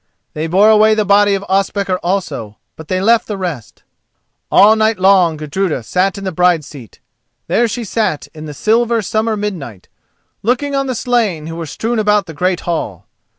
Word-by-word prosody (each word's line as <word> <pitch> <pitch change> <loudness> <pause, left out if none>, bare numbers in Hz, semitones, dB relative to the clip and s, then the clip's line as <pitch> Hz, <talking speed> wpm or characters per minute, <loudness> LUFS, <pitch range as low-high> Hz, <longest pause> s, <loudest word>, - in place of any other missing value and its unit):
They 155 +1 -3
bore 195 +6 +4
away 215 0 +5
the 215 -1 0
body 200 0 +4
of 195 0 -5
Ospakar 195 -1 0
also, 175 - -3 0.2
but 160 - -11
they 185 +1 -1
left 225 +4 +2
the 210 - -4
rest. 170 - -6 0.7
All 215 +2 +6
night 220 -1 +1
long 185 -4 +3
Gudruda 155 -2 -2
sat 185 - 0
in 200 - -7
the 190 - -3
bride's 175 -3 +2
seat. 130 -8 -13 0.5
There 240 - +1
she 235 +2 -4
sat 215 -7 -2
in 155 -1 -9
the 150 -1 -8
silver 230 - +1
summer 220 +2 -1
midnight, 160 - -6 0.5
looking 255 +6 -1
on 275 0 0
the 255 - -2
slain 220 -10 0
who 165 +1 -6
were 165 -1 -6
strewn 225 +9 -2
about 210 -1 +2
the 165 - -9
great 180 +3 -1
hall. 135 - -4
195 Hz, 185 wpm, -16 LUFS, 165-215 Hz, 0.7 s, All